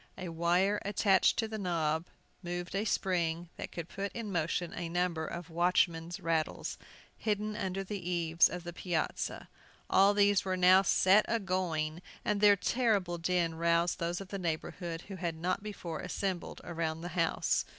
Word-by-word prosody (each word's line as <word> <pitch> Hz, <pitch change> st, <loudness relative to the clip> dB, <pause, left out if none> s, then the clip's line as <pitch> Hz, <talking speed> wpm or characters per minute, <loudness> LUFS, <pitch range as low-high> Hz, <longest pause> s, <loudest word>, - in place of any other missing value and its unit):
A 185 Hz, -, -5 dB
wire 175 Hz, +5 st, +2 dB
attached 195 Hz, -1 st, +3 dB
to 225 Hz, -, +1 dB
the 220 Hz, 0 st, -5 dB
knob 165 Hz, -3 st, 0 dB, 0.3 s
moved 175 Hz, 0 st, -4 dB
a 200 Hz, +2 st, 0 dB
spring 175 Hz, -4 st, 0 dB
that -, -, -6 dB
could 170 Hz, -2 st, -6 dB
put 195 Hz, +2 st, -4 dB
in 225 Hz, -3 st, -5 dB
motion 170 Hz, 0 st, -1 dB
a 170 Hz, -1 st, -4 dB
number 170 Hz, -2 st, -1 dB
of 170 Hz, 0 st, -7 dB
watchmen's 170 Hz, 0 st, +1 dB
rattles, 165 Hz, -2 st, -1 dB, 0.4 s
hidden 210 Hz, 0 st, -1 dB
under 195 Hz, -2 st, -2 dB
the 200 Hz, +1 st, -5 dB
eaves 170 Hz, -1 st, +3 dB
of 180 Hz, -1 st, -6 dB
the 175 Hz, 0 st, -6 dB
piazza. 175 Hz, -2 st, -2 dB, 0.4 s
All 200 Hz, +1 st, +5 dB
these 205 Hz, -1 st, +4 dB
were 185 Hz, -1 st, -1 dB
now 185 Hz, +1 st, +7 dB
set 195 Hz, +2 st, +5 dB
a 230 Hz, -, +1 dB
going, 175 Hz, -5 st, -1 dB, 0.2 s
and 205 Hz, -1 st, 0 dB
their 205 Hz, -1 st, +7 dB
terrible 200 Hz, -5 st, +1 dB
din 170 Hz, -1 st, +1 dB
roused 170 Hz, +1 st, +1 dB
those 170 Hz, +1 st, -1 dB
of 195 Hz, -1 st, -9 dB
the 195 Hz, -, -4 dB
neighborhood 165 Hz, 0 st, -3 dB
who 195 Hz, 0 st, -9 dB
had 170 Hz, -3 st, -2 dB
not 180 Hz, +4 st, -1 dB
before 180 Hz, -6 st, -6 dB
assembled 180 Hz, 0 st, -3 dB
around 165 Hz, -1 st, -3 dB
the 175 Hz, -, -5 dB
house. 170 Hz, -2 st, +1 dB
180 Hz, 170 wpm, -32 LUFS, 170-195 Hz, 0.4 s, now